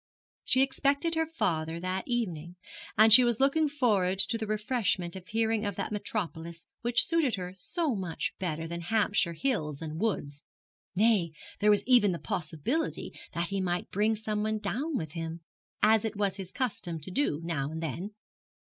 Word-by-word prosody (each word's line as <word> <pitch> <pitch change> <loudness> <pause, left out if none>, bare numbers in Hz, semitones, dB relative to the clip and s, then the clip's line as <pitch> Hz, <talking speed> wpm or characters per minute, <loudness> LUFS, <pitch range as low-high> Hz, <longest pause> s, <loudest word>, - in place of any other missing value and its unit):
She 260 - +4
expected 280 +4 +1
her 320 0 +1
father 165 - -1
that 185 +2 -3
evening, 180 -9 -2 0.4
and 215 0 +7
she 255 - +11
was 240 -2 +2
looking 290 +3 +3
forward 210 -10 +2
to 230 - 0
the 220 - -3
refreshment 210 -5 0
of 185 -1 -9
hearing 225 0 0
of 205 -3 -2
that - - -3
metropolis 170 -6 -4 0.2
which 240 0 +3
suited 325 -8 +2
her 180 -1 -6
so 305 - -1
much 185 -6 -3
better 165 -3 -2
than 170 +1 -5
Hampshire 200 -2 +1
hills 160 - -1
and 160 0 -5
woods; 145 -10 -2 0.5
nay, 200 -5 +3 0.3
there 210 - +3
was 205 -1 +4
even 240 -7 +5
the - - -3
possibility 175 - -2 0.2
that 170 0 -1
he 195 -1 -1
might 175 -1 -2
bring 215 +3 +2
someone 215 0 -1
down 275 +7 -2
with 155 -2 -4
him, 165 0 -5 0.4
as 220 0 +5
it 220 -1 -3
was 200 -1 0
his 190 -2 -5
custom 195 -10 -2
to 155 +5 -7
do 180 - +1
now 145 -5 -2
and 160 +1 -5
then. 175 +7 -4
205 Hz, 175 wpm, -29 LUFS, 170-230 Hz, 0.5 s, she